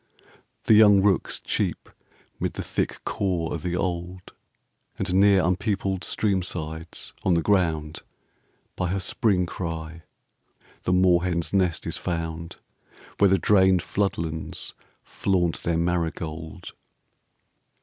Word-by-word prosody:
The - - +4
young 105 -2 +7
rooks 100 -4 +1
cheep - - -2 0.5
'mid - - -2
the - - -4
thick - - -3
caw 90 -5 -1
o' - - -1
the 85 +2 -3
old: 90 0 -4 0.6
And 95 -1 -2
near 100 0 +5
unpeopled 95 +1 -1
stream 100 -3 +1
sides, 80 -2 -6
on 90 - +2
the 85 - +1
ground, 80 -6 +1 0.8
By 90 - -1
her 95 +3 -1
Spring 95 -1 +1
cry 80 -2 -5 0.8
the - - +1
moorhen's 90 -2 +2
nest 90 -4 +1
is - - -3
found, 85 -1 -4 0.6
Where 100 - +6
the 95 - +4
drained 95 -3 +4
flood 100 0 -1
lands 80 -1 -5 0.3
flaunt 90 -4 0
their 85 -1 0
marigold. 80 -2 -3
90 Hz, 120 wpm, -25 LUFS, 85-95 Hz, 0.8 s, young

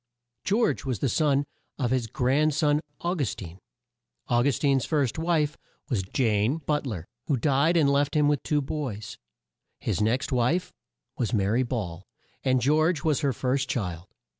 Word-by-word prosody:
George 220 +5 +1
was 130 -4 -2
the 135 - 0
son 140 +2 +2 0.3
of 125 -3 -1
his 130 -3 +1
grand 135 +6 +1
son 150 -1 +2 0.2
Au 175 +1 0
gus 145 - -1
tine. 90 -1 -9 0.7
Au 120 0 +3
gus 140 +1 +2
tine's 135 -3 +2
first 145 -3 0
wife 160 -3 0 0.3
was 120 -8 +1
Jane 110 - +1
But 150 -2 0
ler 90 -9 -4 0.2
who 140 - +2
died 145 +6 +2
and 155 -4 +4
left 140 +1 +2
him 150 -1 +4
with 145 -2 +2
two 150 -1 0
boys. 115 -8 -5 0.6
His - - -1
next 120 +7 +1
wife 130 +9 +1 0.5
was 120 -1 0
Ma 100 - +2
ry 115 +4 +2
Ball, 100 -9 -3 0.4
and 130 -1 +3
George 155 +3 +2
was 155 -4 +2
her 140 -3 +1
first 130 +2 -1
child. 90 -6 -3
135 Hz, 170 wpm, -26 LUFS, 115-150 Hz, 0.7 s, and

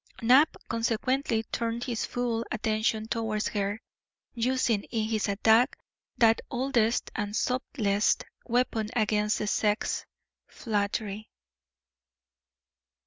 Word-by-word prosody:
Knapp, 260 +7 +5
consequently, 230 +1 0
turned 230 0 -2
his 240 -3 -2
full 240 -2 -1
attention 220 0 0
towards 220 -2 -1
her, 205 0 -2 0.5
using 240 -3 +1
in 220 -2 -2
his 220 -2 0
attack 220 +4 +3 0.4
that 225 -1 +4
oldest 240 -2 0
and 205 -2 -3
subtlest 220 -5 +1 0.2
weapon 230 -3 0
against 210 -2 +1
the - - -2
sex 210 0 0 0.4
flattery. 210 -1 -3
225 Hz, 95 wpm, -28 LUFS, 215-240 Hz, 0.5 s, Knapp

